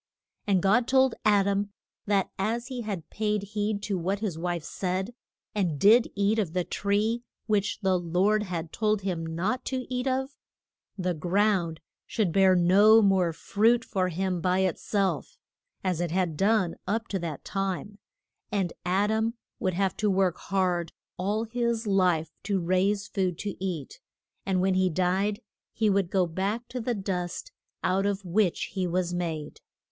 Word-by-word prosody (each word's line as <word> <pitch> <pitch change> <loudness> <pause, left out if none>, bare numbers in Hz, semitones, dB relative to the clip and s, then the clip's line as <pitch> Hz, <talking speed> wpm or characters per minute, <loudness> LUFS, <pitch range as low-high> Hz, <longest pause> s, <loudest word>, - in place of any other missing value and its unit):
And 190 -3 +2
God 225 +5 +3
told 265 -2 +4
Ad 205 -2 +5
am 200 0 0 0.4
that 200 -2 +1
as 230 +5 -1
he 255 -2 -4
had 200 -7 -5
paid 210 -1 -1
heed 205 0 -2
to 200 -3 -1
what 190 +4 -1
his 200 -5 -3
wife 170 0 -2
said, 190 +6 -3 0.4
and 175 -8 0
did 225 - +6
eat 205 +2 +2
of 180 -7 -1
the 180 -1 +1
tree 210 +6 0 0.2
which 210 -1 0
the 190 -2 +2
Lord 185 +5 +2
had 175 -5 -4
told 215 -2 +1
him 180 -4 -2
not 185 +11 -2
to 255 -1 -2
eat 250 +1 -1
of, 265 +1 0 0.7
the 180 -1 0
ground 175 0 +1 0.3
should 205 -6 0
bear 190 +1 +5
no 205 +5 +6
more 190 -4 +3
fruit 225 +8 +2
for 185 -2 0
him 180 0 -1
by 185 +2 +2
it 185 -3 0
self, 200 -2 -1 0.5
as 180 -3 0
it 175 - -1
had 175 -2 0
done 195 0 +2
up 225 +4 -1
to 195 - -1
this 165 -4 -4
time, 195 +1 -3 0.5
and 195 -4 0
Ad 195 +4 +1
am 220 +2 0 0.2
would 185 -3 0
have 190 0 0
to 215 - +1
work 190 -2 +2
hard 180 -3 0 0.3
all 205 +4 0
his 235 0 -1
life 180 -5 +2
to 200 -2 0
raise 190 +4 +1
food 185 -4 -1
to 205 -2 -4
eat, 170 -8 -4 0.5
and 185 -2 +2
when 190 0 +2
he 185 0 +3
died 185 +4 0 0.3
he 220 -2 +2
would 195 -3 +1
go 190 -1 +2
back 195 +8 -2
to 250 - -4
the 240 +1 -1
dust 185 -3 -3 0.3
out 195 +2 +2
of 200 -1 -2
which 180 0 +1
he 190 -2 -1
was 175 0 -1
made. 160 -4 -4
195 Hz, 170 wpm, -27 LUFS, 180-210 Hz, 0.7 s, did